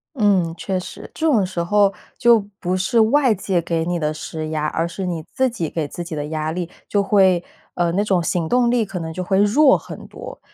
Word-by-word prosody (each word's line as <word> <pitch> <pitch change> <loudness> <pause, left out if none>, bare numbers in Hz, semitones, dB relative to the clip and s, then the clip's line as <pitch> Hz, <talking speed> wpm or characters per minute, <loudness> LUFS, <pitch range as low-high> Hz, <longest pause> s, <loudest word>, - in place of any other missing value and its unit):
嗯， 195 -8 +2
确 190 -2 -2
实。 180 - -9
这 320 - -1
种 240 -11 +3
时 180 -2 -3
候 200 +2 +3 0.3
就 235 -1 +6 0.2
不 180 +1 -1
是 190 +5 +1
外 245 +2 +4
界 185 -3 -1
给 165 -1 -1
你 175 -1 -1
的 155 -1 -1
施 155 0 -6
压， 155 -1 -1
而 165 +2 -1
是 185 +2 -5
你 165 -3 -4
自 260 0 +2
己 190 -10 -4
给 155 -3 -3
自 175 +4 -6
己 170 - -6
的 145 -1 -3
压 155 0 -3
力， 175 0 -4 0.2
就 205 - +1
会 190 -3 +3 0.3
呃， 175 -1 +1
那 200 +3 +1
种 185 -4 +1
行 165 +1 -1
动 245 -1 +3
力 240 -2 +2
可 195 -2 -6
能 160 -1 -5
就 185 +2 -4
会 190 +1 +1
弱 265 +8 +5
很 - - -10
多。 - - -10
185 Hz, 245 characters per minute, -20 LUFS, 165-210 Hz, 0.3 s, 就